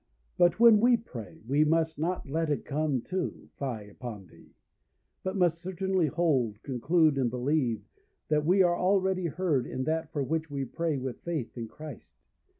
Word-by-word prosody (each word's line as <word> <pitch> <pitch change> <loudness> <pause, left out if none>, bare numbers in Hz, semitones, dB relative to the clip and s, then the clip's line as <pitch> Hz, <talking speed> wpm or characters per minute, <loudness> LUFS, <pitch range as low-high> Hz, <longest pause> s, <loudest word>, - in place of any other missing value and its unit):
But 175 +3 +3
when 230 -2 +8
we 240 +2 +5
pray, 120 - -10
we 145 +4 +4
must 160 0 +1
not 175 +1 -2
let 160 +3 -1
it 145 - -1
come 145 -3 0
to, 185 -1 -4
fie 125 -6 -3
upon 105 -1 -8
thee; - - -19 0.7
but 190 +1 -3
must 175 -3 +2
certainly 185 -1 0
hold, 135 -9 0
conclude, 150 +3 +2
and 125 -3 +2
believe, 125 -1 0 0.4
that 150 -1 +2
we 185 +5 +4
are 175 -1 +3
already 190 -1 +2
heard 155 -5 0
in 130 - -3
that 160 +1 -1
for 145 -4 -1
which 160 +3 -2
we 140 -1 -3
pray 160 +3 -2
with 130 -1 -5
faith 160 -8 -4
in 115 -2 -5
Christ. 155 +7 -11
155 Hz, 170 wpm, -29 LUFS, 130-175 Hz, 0.7 s, when